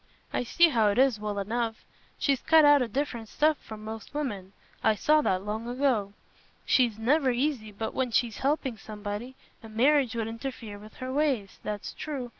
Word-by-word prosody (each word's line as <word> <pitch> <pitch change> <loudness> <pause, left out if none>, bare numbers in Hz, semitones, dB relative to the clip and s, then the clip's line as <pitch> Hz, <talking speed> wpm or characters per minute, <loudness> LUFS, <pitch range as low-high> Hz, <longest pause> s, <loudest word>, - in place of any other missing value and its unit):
I - - 0
see 340 +8 +4
how 225 -7 +3
it 205 - +1
is, 260 -4 +4
well 210 -1 -3
enough. 225 +2 -2 0.3
She's 275 -3 +1
cut 320 -1 +6
out 290 -1 +7
o' 250 - 0
different 235 -2 -3
stuff 310 0 +2
from 215 -1 -10
most 220 +4 -8
women: 205 -10 -4 0.3
I 220 -1 +4
saw 305 +8 +3
that 190 -8 0
long 220 +2 -3
ago. 245 -6 0 0.5
She's 240 -5 +3
never 265 +5 +2
easy 245 -3 -1
but 220 +2 -4
when 260 -1 0
she's 235 -1 0
helping 270 -4 0
somebody, 210 +4 -6 0.3
and 220 -2 -12
marriage 265 0 +3
'ud 225 -1 -1
interfere 230 -3 -6
with 215 +1 -13
her 255 0 -5
ways—that's 215 -7 -2
true. 275 -5 -5
235 Hz, 180 wpm, -28 LUFS, 215-275 Hz, 0.5 s, out